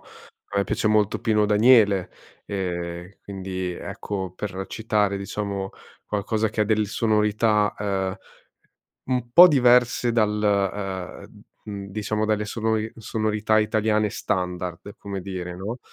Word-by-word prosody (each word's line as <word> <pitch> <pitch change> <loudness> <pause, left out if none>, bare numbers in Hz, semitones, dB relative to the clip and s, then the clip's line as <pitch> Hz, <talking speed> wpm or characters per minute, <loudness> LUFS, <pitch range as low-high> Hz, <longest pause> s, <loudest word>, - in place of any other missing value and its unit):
a 100 - -9
me 100 - +2
piace - - -1
molto 105 -1 +2
Pino 110 -2 +2
Daniele. 105 -4 +4 0.3
Eh, 90 -1 -5
quindi, 95 -2 -5
ecco, 95 +1 -5
per 95 -2 -5
citare 105 -3 0
diciamo, 100 0 -4 0.3
qualcosa 105 +1 -1
che 105 - 0
delle 110 0 +2
sonorità, 105 0 +1
uhm 95 -2 -2 0.9
un 125 -2 -2
po' 180 +7 +10
diverse 125 -4 +4
dal, 110 -3 +3 1.0
uhm, - - -18 0.2
mhmm, 100 -2 -6
diciamo 105 +1 -2
dalle 105 -1 0
sonori 110 0 -1
sonorità 110 -1 0
italiane 110 0 +1
standard, 90 +1 -3
come 100 -1 -6
dire 90 -2 -6
no. 105 +7 -5
105 Hz, 120 wpm, -24 LUFS, 95-110 Hz, 1.0 s, po